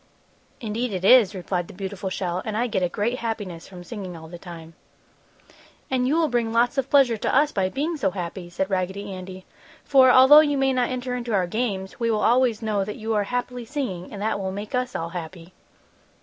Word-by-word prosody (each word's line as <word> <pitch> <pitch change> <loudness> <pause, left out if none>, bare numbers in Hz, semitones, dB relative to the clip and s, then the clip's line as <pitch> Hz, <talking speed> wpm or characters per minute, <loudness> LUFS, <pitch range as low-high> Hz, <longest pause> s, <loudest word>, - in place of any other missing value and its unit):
"Indeed 225 +1 -3
it 185 0 -3
is," 215 -3 +6
replied 180 -1 -3
the - - -12
beautiful 195 0 -5
shell, 180 -1 -3
"and 215 -1 -3
I 240 - +1
get 215 -6 -1
a 180 - +1
great 225 +7 -2
happiness 205 -7 -5
from 180 -2 -11
singing 185 -4 -7
all 160 0 -11
the 170 +1 -10
time." 165 -2 -10 1.2
"And 255 -1 +1
you 290 - +2
will 330 -1 +3
bring 240 -4 0
lots 240 +4 +2
of 270 0 -2
pleasure 265 -5 +4
to - - -1
us, 290 +2 +4
by 190 -1 0
being 310 - -2
so 200 -9 +1
happy!" 180 -1 -6
said 190 +3 -3
Raggedy 190 +2 -2
Andy. 185 0 -9 0.4
"For 265 -2 +5
although 260 +4 +8
you 290 -2 +2
may 270 0 +2
not 250 -1 +1
enter 255 0 -3
into 240 -3 -2
our 185 -2 +2
games, 195 -1 -3
we 230 -1 0
will 215 -2 0
always 240 -2 +2
know 210 -2 0
that 210 +2 -5
you 220 +1 -3
are 205 -1 +1
happily 245 +2 -3
singing, 225 -10 -4
and 205 - -7
that 220 -1 -1
will 190 -1 -3
make 205 +2 -7
us 250 0 -1
all 165 0 -3
happy!" 170 0 -8
210 Hz, 220 wpm, -24 LUFS, 185-250 Hz, 1.2 s, although